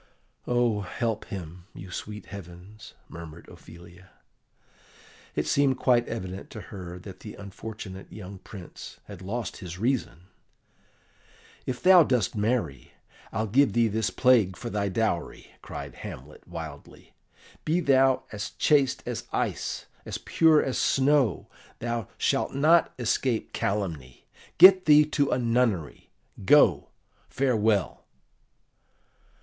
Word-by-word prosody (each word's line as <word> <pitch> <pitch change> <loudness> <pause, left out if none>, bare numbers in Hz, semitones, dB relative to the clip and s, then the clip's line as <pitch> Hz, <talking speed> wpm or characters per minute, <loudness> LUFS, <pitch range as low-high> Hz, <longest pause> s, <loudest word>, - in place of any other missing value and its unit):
"Oh, 120 -3 +2
help 110 +3 -3
him, 90 -2 -8
you 95 +1 -10
sweet 105 +3 -7
heavens!" 95 +2 -11
murmured 85 0 -11
Ophelia. 90 +2 -15 1.3
It - - 0
seemed 140 -2 +2
quite 120 -2 +2
evident 95 -4 -6
to 110 - -8
her 90 -2 -7
that 95 0 -11
the 105 - -9
unfortunate 100 -1 -9
young 95 -2 -9
Prince 95 -3 -11
had 100 -3 -11
lost 110 +5 -4
his 90 -3 -8
reason. 115 -5 -1 1.4
"If 125 -1 -4
thou 185 -1 +8
dost 125 - +1
marry, 105 - -2 0.4
I'll 110 +2 -1
give 125 +2 +3
thee 115 0 +3
this 110 -1 0
plague 110 -4 +3
for 120 - -6
thy 100 -1 -1
dowry," 95 -3 -2
cried - - -8
Hamlet - - -10
wildly: 80 -4 -10 0.5
"be 160 +3 +1
thou 135 -4 +3
as 105 -1 -5
chaste 140 -4 +2
as - - -5
ice, - - -2 0.2
as - - -5
pure 160 -2 +3
as 130 - -2
snow, 135 - +2 0.3
thou 120 -3 -3
shalt - - 0
not 160 +5 +4
escape 120 -1 -1
calumny. 80 -11 -3 0.3
Get 185 +1 +9
thee 150 0 +7
to 145 -2 +1
a - - +1
nunnery. 115 - 0 0.3
Go; - - +5 0.4
farewell!" 110 -7 0
110 Hz, 120 wpm, -27 LUFS, 95-130 Hz, 1.4 s, Get